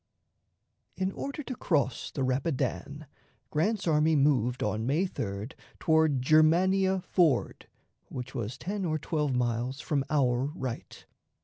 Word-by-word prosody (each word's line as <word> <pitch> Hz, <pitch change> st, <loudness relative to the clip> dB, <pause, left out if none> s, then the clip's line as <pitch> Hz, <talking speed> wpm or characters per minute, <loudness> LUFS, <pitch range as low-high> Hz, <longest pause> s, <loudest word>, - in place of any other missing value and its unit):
In 190 Hz, 0 st, 0 dB
order 280 Hz, +7 st, -5 dB
to 255 Hz, -, -5 dB
cross 140 Hz, -, 0 dB
the 135 Hz, -, -3 dB
Rapidan, 140 Hz, +2 st, -2 dB, 0.5 s
Grant's 195 Hz, +6 st, 0 dB
army 155 Hz, 0 st, +3 dB
moved 130 Hz, -4 st, +2 dB
on 110 Hz, +2 st, -1 dB
May 155 Hz, +8 st, +2 dB
3d 100 Hz, -, -4 dB, 0.2 s
toward 160 Hz, -5 st, +2 dB
Germania 185 Hz, +6 st, +4 dB
Ford, 170 Hz, -7 st, +1 dB, 0.4 s
which 125 Hz, +1 st, -6 dB
was 120 Hz, -1 st, -4 dB
ten 200 Hz, +5 st, -4 dB
or 155 Hz, -3 st, 0 dB
twelve 150 Hz, -3 st, -1 dB
miles 125 Hz, +2 st, -1 dB
from 145 Hz, -3 st, -1 dB
our 130 Hz, -4 st, +2 dB
right. 130 Hz, -8 st, -6 dB
150 Hz, 125 wpm, -29 LUFS, 125-170 Hz, 0.5 s, Germania